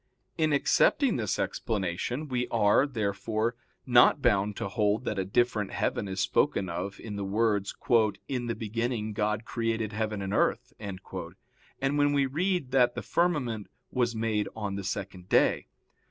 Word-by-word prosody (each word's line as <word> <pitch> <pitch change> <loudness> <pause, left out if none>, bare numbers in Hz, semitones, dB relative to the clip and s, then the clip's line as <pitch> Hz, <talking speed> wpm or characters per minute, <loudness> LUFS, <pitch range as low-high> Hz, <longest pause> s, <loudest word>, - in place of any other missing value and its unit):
In 155 -2 +1
accepting 140 - +3
this - - -1
explanation 110 - -2
we 125 -2 -1
are, 110 +5 +3
therefore, 110 -1 -1 0.3
not 125 +3 +6
bound 100 -4 +1
to - - -2
hold 105 +4 0
that 105 - -1
a 95 - -1
different 105 0 +1
heaven - - -1
is 95 0 -4
spoken 95 0 +1
of 90 +4 -4
in 105 -2 -6
the 100 - -3
words: 100 0 0 0.5
"In 125 -3 -2
the 115 - -1
beginning 115 0 -2
God 105 +1 -1
created 115 -2 -2
heaven 110 -2 -2
and 95 - -3
earth," - - +1
and 100 -3 -6 1.0
when 145 0 +3
we 140 -1 +3
read 165 0 -1
that 125 -2 +4
the - - -4
firmament 130 - 0 0.2
was 120 -2 0
made 110 -2 0
on 105 -3 -3
the 100 0 -4
second 95 -1 -5
day. - - +3
110 Hz, 155 wpm, -28 LUFS, 100-125 Hz, 1.0 s, not